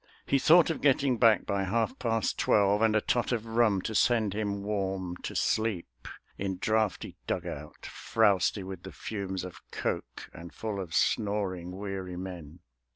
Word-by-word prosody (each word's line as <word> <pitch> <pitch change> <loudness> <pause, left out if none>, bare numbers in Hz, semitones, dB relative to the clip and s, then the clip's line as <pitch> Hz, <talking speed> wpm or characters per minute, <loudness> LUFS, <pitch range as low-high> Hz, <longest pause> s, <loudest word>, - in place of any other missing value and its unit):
He 140 - +2
thought 165 +4 +6
of 160 - -4
getting 135 -3 +3
back 115 -3 +5
by 100 -1 0
half 110 +6 -1
past 115 -3 0
twelve, 100 0 +3
And 110 -1 +4
tot 120 0 +1
of 115 -2 -1
rum 115 -4 +2
to 110 - -3
send 110 -3 +2
him 100 -1 -2
warm 95 -3 -2
to - - -7
sleep, 95 - -1 0.3
In 95 -1 -2
draughty 110 +1 -1
dug - - -2
out - - -8
frowsty 100 -2 +1
with 95 -2 -7
the 95 - -9
fumes 95 -3 -4
Of 85 -3 -9
coke, - - -4
and 85 +1 -10
full 110 -3 -4
of 90 -4 -5
snoring, 95 -4 0
weary 95 -3 -5
men. 90 -3 -8
100 Hz, 160 wpm, -29 LUFS, 95-110 Hz, 0.3 s, thought